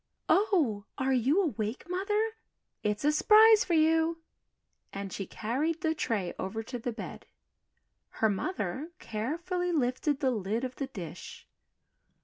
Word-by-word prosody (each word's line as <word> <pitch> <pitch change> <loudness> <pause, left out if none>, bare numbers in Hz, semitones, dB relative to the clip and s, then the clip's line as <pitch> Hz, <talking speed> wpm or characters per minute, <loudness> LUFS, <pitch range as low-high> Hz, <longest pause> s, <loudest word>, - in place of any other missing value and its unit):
"Oh, 310 - +2
are 265 0 +1
you 270 - +3
awake, 235 - -3
Mother? 415 +5 0 0.5
It's 210 +4 -1
a 300 - +5
s'prise 435 +6 +7
for 345 - 0
you," 325 +1 +3 0.7
and 195 -1 -6
she 195 - -4
carried 290 +9 -2
the 320 -1 +1
tray 220 - -2
over 220 +4 -3
to 245 +2 -6
the 245 +1 -3
bed. 225 - -8 0.8
Her 220 - +1
mother 260 - -3
carefully 340 - -2
lifted 270 -1 0
the 265 - +2
lid 220 +1 -2
of 255 -1 -4
the 275 - -3
dish. 175 - -9
265 Hz, 135 wpm, -30 LUFS, 220-335 Hz, 0.8 s, s'prise